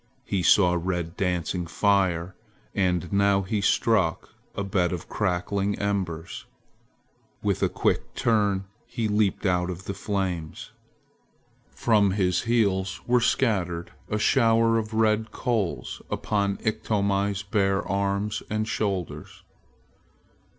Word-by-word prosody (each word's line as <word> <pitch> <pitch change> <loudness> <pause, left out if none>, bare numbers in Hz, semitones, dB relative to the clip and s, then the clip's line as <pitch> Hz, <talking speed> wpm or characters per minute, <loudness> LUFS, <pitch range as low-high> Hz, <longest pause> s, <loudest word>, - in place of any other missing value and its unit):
He 95 - -1
saw 90 0 +5
red 90 -1 -2
dancing 90 -2 -1
fire, 95 -2 +1 0.4
and 90 -3 0
now 100 0 +3
he 100 +2 -1
struck 95 -3 +1 0.3
a 100 - -2
bed 90 -3 0
of 90 -3 -5
cracking 100 +1 -1
embers. 95 -5 -3 1.0
With - - 0
a - - +3
quick - - -1
turn 100 -4 +1 0.2
he 115 -2 -2
leaped 105 -1 +1
out 90 -1 +1
of 90 +1 -6
the 100 - -3
flames. 95 -7 -3 1.0
From 105 -4 +2
his 90 +3 +1
heels 95 -5 +1
were 125 0 +3
scattered 95 -9 0 0.2
a 105 - 0
shower 115 -1 +3
of 110 0 -5
red 110 0 +2
coals 100 - -2
upon 100 -2 -1
Iktomi's 100 -2 0
bare 100 -1 0
arms 100 +1 -1
and 110 0 -1
shoulders. 100 -6 -3
100 Hz, 115 wpm, -26 LUFS, 90-105 Hz, 1.0 s, saw